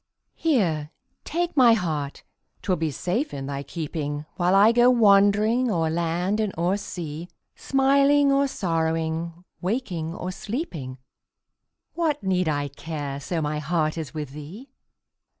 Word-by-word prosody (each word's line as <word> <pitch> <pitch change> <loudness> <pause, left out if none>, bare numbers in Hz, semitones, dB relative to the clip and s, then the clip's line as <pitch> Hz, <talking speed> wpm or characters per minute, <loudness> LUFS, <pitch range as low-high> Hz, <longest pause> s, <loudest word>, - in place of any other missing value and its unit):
Here, 175 - +1 0.4
take 345 +1 -2
my 250 -4 +7
heart 155 -9 -2 0.4
'twill 185 -3 +1
be 160 0 -1
safe 185 - -2
in 135 -1 -5
thy 140 0 -4
keeping, 150 -1 -4
While 180 +1 +2
I 205 +3 +7
go 240 +1 +5
wandering 215 +1 +4
o'er 165 -6 +1
land 170 +5 0
and 215 -2 0
o'er 175 +3 +1
sea; 170 -4 -6 0.3
Smiling 275 +1 +3
or 275 0 +3
sorrowing, 165 -3 -2 0.2
waking 180 -6 -2
or 185 0 -4
sleeping, 180 - -5 1.0
What 315 -6 -1
need 185 -3 +1
I 145 -1 -1
care, 145 -1 -5
so 160 +2 -2
my 150 0 -1
heart 155 0 0
is 160 -6 -5
with 150 -4 -5
thee? 170 - -10
175 Hz, 135 wpm, -25 LUFS, 155-225 Hz, 1.0 s, my